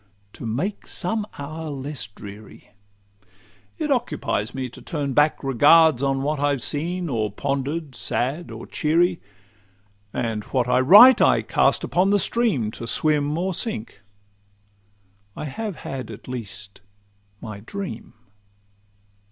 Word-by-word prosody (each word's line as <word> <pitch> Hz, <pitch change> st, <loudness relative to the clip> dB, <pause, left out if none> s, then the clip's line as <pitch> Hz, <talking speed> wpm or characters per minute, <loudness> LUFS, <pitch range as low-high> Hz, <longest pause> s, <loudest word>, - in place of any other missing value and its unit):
—To 115 Hz, -, -7 dB
make 150 Hz, -, -3 dB
some 210 Hz, +4 st, 0 dB
hour 155 Hz, +3 st, -6 dB
less 140 Hz, -3 st, -5 dB
dreary. 100 Hz, +1 st, -13 dB, 1.1 s
It 305 Hz, -2 st, -2 dB
occupies 230 Hz, -, -1 dB
me 130 Hz, -1 st, -3 dB
to 125 Hz, -, -13 dB
turn 145 Hz, -4 st, -3 dB
back 150 Hz, +3 st, +2 dB
regards 145 Hz, +2 st, +5 dB
On 135 Hz, -1 st, 0 dB
what 150 Hz, +1 st, -1 dB
I've 145 Hz, -3 st, 0 dB
seen 175 Hz, +4 st, 0 dB
or 110 Hz, -7 st, -1 dB
ponder'd, 140 Hz, +5 st, -3 dB
sad 130 Hz, +7 st, -2 dB
or -, -, -8 dB
cheery; 170 Hz, +3 st, +1 dB, 0.9 s
And 110 Hz, -2 st, -2 dB
what 130 Hz, -2 st, 0 dB
I 125 Hz, 0 st, +3 dB
write 205 Hz, -, +8 dB
I -, -, +4 dB
cast -, -, +2 dB
upon 185 Hz, +2 st, +1 dB
the 205 Hz, -, +4 dB
stream, 200 Hz, -, +1 dB
To 115 Hz, -, -8 dB
swim 150 Hz, +4 st, +1 dB
or 185 Hz, +2 st, -1 dB
sink—I 100 Hz, -, -9 dB
have 200 Hz, +8 st, -5 dB
had 135 Hz, -3 st, -6 dB
at -, -, -11 dB
least 105 Hz, -5 st, -6 dB, 0.6 s
my 105 Hz, -2 st, -8 dB
dream. 145 Hz, -, -7 dB
140 Hz, 125 wpm, -23 LUFS, 110-165 Hz, 1.1 s, write